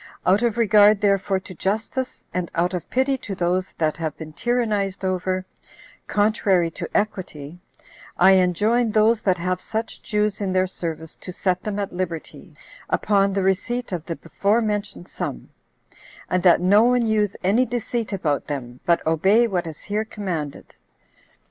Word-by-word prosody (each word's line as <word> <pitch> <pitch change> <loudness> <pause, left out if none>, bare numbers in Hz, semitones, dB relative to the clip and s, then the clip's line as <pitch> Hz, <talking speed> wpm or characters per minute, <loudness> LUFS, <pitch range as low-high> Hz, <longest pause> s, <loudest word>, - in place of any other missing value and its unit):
Out 190 +4 +4
of 235 -2 0
regard 210 -2 +5
therefore 200 -1 +1
to 185 - -11
justice, 220 +8 -3
and 180 -1 -2
out 175 +2 +1
of 180 - -4
pity 265 +1 +1
to 200 - -6
those 180 +1 -1
that 155 -2 -1
have 160 -3 -4
been 155 -1 -9
tyrannized 210 -4 -1
over, 185 0 -1 0.6
contrary 205 -5 +2
to - - -6
equity, 175 -6 -4 0.6
I 190 +2 +7
enjoin 205 +6 +3
those 220 +1 +3
that 185 -3 +2
have 180 +1 -2
such 225 +1 -4
Jews 210 -1 -1
in 190 -2 -1
their 185 0 +3
service 160 -3 -5
to 185 - -8
set 180 0 -1
them 210 -1 -4
at 200 -2 -3
liberty, 175 -3 -5 0.3
upon 200 -1 +2
the 195 -1 0
receipt 220 +6 -1
of 175 -4 -3
the 165 - -3
before 200 +7 0
mentioned 210 -5 -3
sum; - - -5 0.8
and 180 - +2
that 175 -1 +5
no 200 +4 +5
one 245 0 +3
use 210 -2 +1
any 225 +7 +3
deceit 235 -1 -3
about 160 -8 -1
them, 125 -4 -5
but 170 -1 +2
obey 190 +9 +4
what 180 -5 -2
is 160 - -8
here 210 +2 -2
commanded. 180 -9 -5
195 Hz, 160 wpm, -23 LUFS, 175-215 Hz, 0.8 s, I